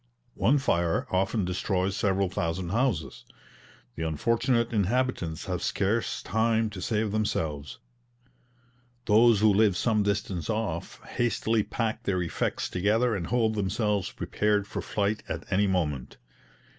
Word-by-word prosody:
One 140 +5 +3
fire 85 -11 +1
often 95 +2 +1
destroys 95 +1 -1
several 100 -2 +1
thousand 85 0 -2
houses. 90 - -1 0.7
The - - -6
unfortunate 115 - +1
inhabitants 105 -5 0
have - - -3
scarce 105 +4 -1
time 110 0 +1
to 95 -3 -7
save 110 0 0
themselves; 80 -9 -2 1.3
those 110 0 +5
who 110 -1 +5
live 100 -2 +3
some 110 -3 +2
distance 100 -3 -2
off 105 -7 -3
hastily 115 -2 0
pack 110 +1 -2
their 95 -5 0
effects 85 - -2
together 110 +5 +1
and 85 -4 -3
hold 115 -2 +1
themselves 105 0 0
prepared 105 -1 0
for - - -5
flight 105 +1 -1
at - - -4
any 100 +2 +3
moment. 75 -9 -2
105 Hz, 130 wpm, -27 LUFS, 90-110 Hz, 1.3 s, those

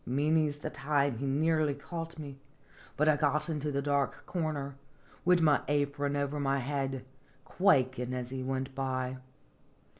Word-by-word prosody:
Many's 150 +3 +1
the 150 +1 -5
time 140 -4 0
he 140 - -2
nearly 155 +1 +2
caught 165 +3 -6
me, 140 -3 -8 0.6
but 150 - +3
I 155 -1 +5
got 150 +2 +1
into 150 -2 -1
the 140 0 -1
dark 140 -1 0
corner, 155 -5 -2 0.5
wid 180 -1 +5
my 150 -3 +4
apron 145 0 0
over 140 +1 -1
my 140 -1 +1
head, 135 -1 -2 0.4
quakin' 130 -9 +2
as 125 -1 -4
he 130 -1 -3
went 130 +1 -2
by. 130 -1 -2
140 Hz, 150 wpm, -31 LUFS, 135-150 Hz, 0.6 s, I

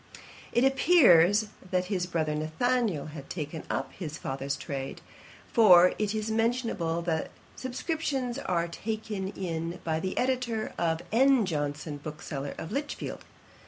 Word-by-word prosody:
It 240 - +3
appears 220 - +5 0.2
that 185 0 +1
his 180 -2 -1
brother 160 -3 -1
Nathanael 155 - 0
had 140 -3 -9
taken 155 -1 -4
up - - -2
his 155 -4 -6
father's 135 -1 -3
trade; 135 -2 -5 0.5
for 180 -6 +7
it 210 0 0
is 215 0 -2
mentioned 230 +2 +1 0.3
that 160 -2 -1 0.3
'subscriptions 265 -1 -2
are 170 -8 0
taken 210 +1 -4
in 170 -3 -4
by 160 -1 0
the 185 +3 -3
Editor, 245 -4 0
or 165 -1 +1
N. 260 0 +5
Johnson, 145 -2 -3
bookseller, 145 -1 -6
of 160 - -6
Lichfield.' 285 +4 -4
185 Hz, 130 wpm, -29 LUFS, 160-235 Hz, 0.5 s, for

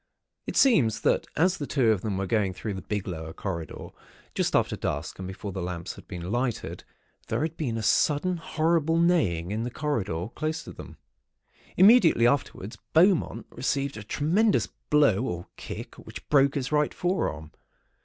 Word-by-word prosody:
It - - -3
seems 135 - +4
that - - +1
as 180 +3 +2
the 145 - -4
two 125 -6 +3
of 105 -4 0
them 100 -2 -2
were 95 - -1
going 100 -1 0
through 105 +1 -4
the 95 - -6
big 105 -2 -4
lower 80 -3 -5
corridor, 85 -4 -5 0.4
just - - 0
after - - +2
dusk 75 +4 -4
and 95 - -5
before 95 +2 -6
the 95 - -5
lamps 85 -1 -4
had - - -14
been 90 +1 -6
lighted, 120 0 -2 0.4
there - - -1
had 160 0 -3
been 125 -9 -2
a 110 - -3
sudden, 150 - +2
horrible 165 0 +1
neighing 105 - +2
in 110 +2 -2
the 120 - -2
corridor, 110 - -2
close 155 +1 -3
to - - -9
them. - - -11 0.8
Immediately 190 - +6
afterwards, 120 -5 -1
Beaumont 175 +2 +3
received 140 +1 -2
a 110 - -7
tremendous 170 - +2 0.2
blow 145 -9 +4
or 90 -7 -4
kick, - - -8
which - - -11
broke 140 -1 +4
his 135 -1 -2
right 150 -1 +1
forearm. 80 - -2
120 Hz, 175 wpm, -27 LUFS, 95-155 Hz, 0.8 s, Immediately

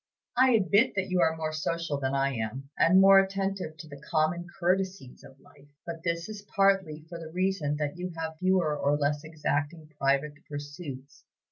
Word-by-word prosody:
I 255 +1 +5
admit 210 +3 +3
that 190 -1 -1
you 180 -1 +2
are 160 -1 +2
more 155 -1 -3
social 155 -1 -2
than 135 0 -1
I 135 0 +1
am, 125 +4 -5
and 185 +3 +5
more 195 0 +8
attentive 195 -4 -2
to 160 - -10
'the 145 -2 -11
common 160 +2 0
courtesies 185 -6 -1
of 135 0 -15
life;' 145 +1 -21 0.2
but 165 -1 -6
this 170 -1 -1
is 215 -1 -7
partly 195 -6 +1
for 170 0 -8
the 160 -1 -8
reason 180 -4 0
that 150 +1 -3
you 180 0 -3
have 160 -1 -4
fewer 185 -5 +2
or 145 0 +1
less 145 0 0
exacting 155 0 -3
private 140 +2 0
pursuits. 145 -2 -8
160 Hz, 180 wpm, -28 LUFS, 145-185 Hz, 0.2 s, more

